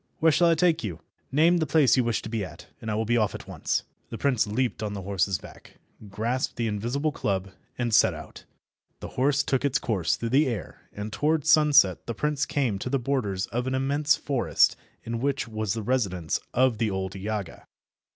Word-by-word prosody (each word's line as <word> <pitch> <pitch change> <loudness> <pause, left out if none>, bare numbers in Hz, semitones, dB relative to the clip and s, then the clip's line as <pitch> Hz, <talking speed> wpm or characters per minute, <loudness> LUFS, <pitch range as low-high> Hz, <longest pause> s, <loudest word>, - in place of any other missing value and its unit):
Where 160 0 +4
shall 170 +3 +4
I 165 - +4
take 165 -3 +2
you? 90 -7 -4 0.3
Name 165 +5 +4
the 160 -2 0
place 145 -3 +4
you 130 - +3
wish 115 -2 -1
to - - -6
be 110 -2 -2
at, - - -9 0.2
and 110 - -5
we 105 - 0
will 110 +1 0
be 120 +2 +2
off 105 -3 +1
at - - -9
once." - - -2 0.3
The - - -6
prince 125 -6 +1
leaped 115 +1 -1
on 105 -1 -3
the 100 - -6
horse's 95 -1 0
back, - - -15 0.3
grasped 115 +6 -2
the 120 - -1
invisible 120 +8 -1
club, 95 -7 -2 0.3
and 120 -2 -1
set - - +5
out. - - -11 0.6
The - - -7
horse 135 +2 +1
took 135 0 0
its 140 -1 +2
course 95 -11 0
through 115 - -4
the 140 +4 +3
air, 115 -7 -6
and 105 +1 -6
towards 155 0 +2
sunset 145 - +5
the 115 - -3
prince 150 +3 -1
came 130 -10 0
to 125 - -4
the 135 - +1
borders 115 -8 -1
of 120 +2 -2
an 130 - 0
immense 145 +3 +2
forest 135 -4 +2 0.3
in 115 0 -4
which 140 0 -1
was 110 -2 -2
the 110 - -4
residence 100 -9 0
of 125 -3 +2
the 115 -2 +1
old 95 -1 -3
Yaga. 100 -1 -5
120 Hz, 210 wpm, -26 LUFS, 105-140 Hz, 0.6 s, set